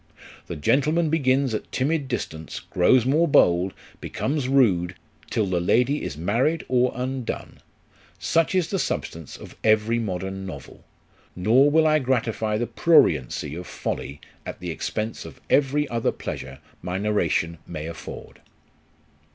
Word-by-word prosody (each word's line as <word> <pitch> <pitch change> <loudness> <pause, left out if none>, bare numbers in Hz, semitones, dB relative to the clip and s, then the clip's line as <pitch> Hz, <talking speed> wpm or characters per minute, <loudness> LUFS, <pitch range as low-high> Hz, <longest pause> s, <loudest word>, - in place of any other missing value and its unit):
The - - -5
gentleman 150 - +2
begins 135 -4 +2
at 110 - -4
timid 145 +2 0
distance, 80 - -5
grows 115 +7 +3
more 155 +6 +3
bold, 90 -7 +4 0.3
becomes 140 -2 -2
rude, 95 -10 +3 0.3
till 110 - +1
the 90 -2 0
lady 125 +11 +2
is 80 -5 -5
married 120 - 0
or 125 0 +2
undone: 130 0 -4 0.6
such 160 - +1
is 175 -3 +1
the 195 - 0
substance 80 - -4
of - - -12
every 110 +2 +3
modern 95 -2 -4
novel; 80 -8 -9 0.5
nor 120 +10 +4
will 160 +2 +4
I 155 0 +4
gratify 115 -5 0
the 120 - -1
pruriency 85 - +2
of 90 +1 -7
folly 70 +1 -4 0.2
at - - -7
the 90 -1 -4
expense 110 +7 -4
of - - -11
every 145 +1 +3
other 115 -1 0
pleasure 65 0 -6 0.2
my 90 +1 -3
narration 85 -5 0
may 75 -3 -6
afford. 80 -1 -9
115 Hz, 140 wpm, -24 LUFS, 90-135 Hz, 0.6 s, bold